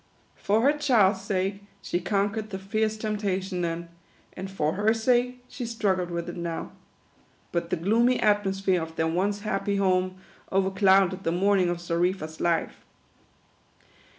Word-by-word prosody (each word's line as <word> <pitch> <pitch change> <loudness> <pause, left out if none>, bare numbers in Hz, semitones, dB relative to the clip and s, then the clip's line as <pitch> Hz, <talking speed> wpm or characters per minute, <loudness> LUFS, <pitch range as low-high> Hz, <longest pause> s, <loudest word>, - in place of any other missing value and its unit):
For 210 +3 +1
her 280 +4 +4
child's 220 -10 +3
sake 195 0 -2 0.2
she 175 - -1
conquered 205 +4 -1
the 190 - -4
fierce 215 +3 -1
temptation 200 -4 -2
then; 170 0 -3 0.4
and 190 +1 -6
for 155 -5 -1
her 210 +3 +2
sake, 245 +2 +1
she 250 - -7
struggled 195 -6 0
with 170 0 -4
it 175 - -6
now. 170 -1 -4 0.8
But 170 -1 -2
the - - +1
gloomy 230 +9 +2
atmosphere 195 -3 +2
of 160 0 -7
their 160 - 0
once 195 +5 0
happy 200 -1 -1
home 185 -1 +1 0.4
overclouded 190 -1 +3
the 165 - 0
morning 190 0 +2
of 175 - -1
Xarifa 175 0 -1
's 160 0 -14
life. 170 -1 0
195 Hz, 150 wpm, -26 LUFS, 175-210 Hz, 0.8 s, her